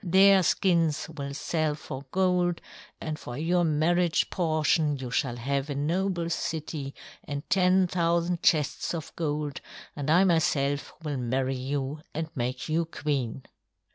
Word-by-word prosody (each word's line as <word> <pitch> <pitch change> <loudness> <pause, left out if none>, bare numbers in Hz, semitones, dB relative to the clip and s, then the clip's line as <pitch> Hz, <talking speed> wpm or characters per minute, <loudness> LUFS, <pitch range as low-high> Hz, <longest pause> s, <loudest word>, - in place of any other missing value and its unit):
Their 190 +2 +6
skins 165 -4 +2
will 140 -1 -5
sell 155 +1 0
for 140 -2 -8
gold, 180 0 +1 0.4
and 155 -1 -4
for 120 0 -7
your 175 +3 +2
marriage 165 +2 +2
portion 155 -3 +1
you 130 -2 -6
shall 125 -1 0
have 135 +4 -2
a 145 - -2
noble 170 +4 0
city 155 -4 -3 0.3
and 145 +1 -5
ten 185 0 +4
thousand 170 0 0
chests 155 +1 +2
of 160 -3 -7
gold, 150 -3 -2 0.3
and 145 0 -3
I 175 +4 +6
myself 145 -5 +1
will 150 -3 -2
marry 130 +2 -1
you 135 +3 -3 0.2
and 160 0 -3
make 125 0 -2
you 165 +2 +1
queen." 135 -6 -2
155 Hz, 140 wpm, -27 LUFS, 140-170 Hz, 0.4 s, Their